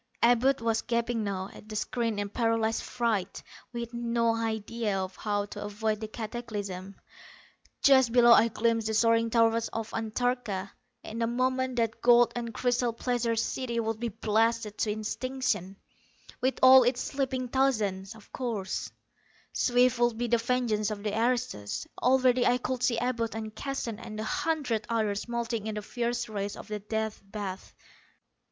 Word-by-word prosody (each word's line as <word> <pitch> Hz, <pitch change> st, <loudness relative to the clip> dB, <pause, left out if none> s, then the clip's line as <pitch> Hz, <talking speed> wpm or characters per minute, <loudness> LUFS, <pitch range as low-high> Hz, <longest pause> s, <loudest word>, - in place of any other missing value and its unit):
Abud 245 Hz, +2 st, +4 dB
was 225 Hz, -1 st, +1 dB
gaping 235 Hz, -1 st, -1 dB
now 195 Hz, -1 st, -3 dB
at 215 Hz, -, -14 dB
the 215 Hz, -, -6 dB
screen 230 Hz, 0 st, -1 dB
in 205 Hz, 0 st, -1 dB
paralyzed 225 Hz, 0 st, 0 dB
fright, 225 Hz, -6 st, -2 dB, 0.3 s
with 235 Hz, -1 st, -5 dB
no 235 Hz, -1 st, +1 dB
idea 225 Hz, -1 st, -2 dB
of 190 Hz, -1 st, -4 dB
how 205 Hz, -1 st, -1 dB
to 205 Hz, -, -7 dB
avoid 215 Hz, +1 st, -2 dB
the 220 Hz, -, -5 dB
cataclysm. 210 Hz, -4 st, -6 dB, 0.9 s
Just 265 Hz, -4 st, +6 dB
below 240 Hz, 0 st, +6 dB
I 230 Hz, -, +6 dB
glimpsed 225 Hz, 0 st, 0 dB
the 220 Hz, -, -1 dB
soaring 230 Hz, +1 st, +3 dB
towers 230 Hz, 0 st, +3 dB
of 225 Hz, 0 st, -5 dB
Antarcha. 225 Hz, -3 st, -2 dB, 0.3 s
In 225 Hz, +2 st, -5 dB
a 230 Hz, -, +2 dB
moment 255 Hz, +1 st, 0 dB
that 230 Hz, -2 st, -1 dB
gold 240 Hz, 0 st, +5 dB
and 235 Hz, -1 st, -3 dB
crystal 245 Hz, 0 st, 0 dB
pleasure 235 Hz, -1 st, -1 dB
city 235 Hz, +1 st, -1 dB
would 225 Hz, -1 st, -2 dB
be 235 Hz, 0 st, -2 dB
blasted 220 Hz, 0 st, 0 dB
to 215 Hz, -, +1 dB
extinction, 215 Hz, -2 st, -2 dB, 0.7 s
with 260 Hz, +1 st, +1 dB
all 260 Hz, 0 st, +10 dB
its 245 Hz, 0 st, +2 dB
sleeping 260 Hz, -2 st, -2 dB
thousands. 220 Hz, -7 st, 0 dB, 1.4 s
Swift 250 Hz, 0 st, +3 dB
would 240 Hz, -2 st, +2 dB
be 240 Hz, -, -1 dB
the 235 Hz, 0 st, +3 dB
vengeance 230 Hz, -3 st, 0 dB
of 205 Hz, -1 st, -5 dB
the 210 Hz, -1 st, -2 dB
aristos. 225 Hz, -, -1 dB, 0.2 s
Already 255 Hz, -1 st, +4 dB
I 245 Hz, -, +4 dB
could 250 Hz, 0 st, -3 dB
see 235 Hz, -2 st, +2 dB
Abud 230 Hz, -2 st, -1 dB
and 220 Hz, -1 st, -5 dB
Keston 240 Hz, -4 st, -4 dB
and 215 Hz, -2 st, -7 dB
a -, -, -2 dB
hundred 250 Hz, -3 st, -1 dB
others 215 Hz, -3 st, -1 dB
melting 235 Hz, -2 st, -2 dB
in 215 Hz, -, -3 dB
the 210 Hz, -, -4 dB
fierce 240 Hz, +2 st, -2 dB
rays 205 Hz, -2 st, -4 dB
of -, -, -10 dB
the 210 Hz, 0 st, -3 dB
Death 220 Hz, +1 st, -3 dB
Bath! 195 Hz, -1 st, -7 dB
230 Hz, 160 wpm, -29 LUFS, 215-245 Hz, 1.4 s, all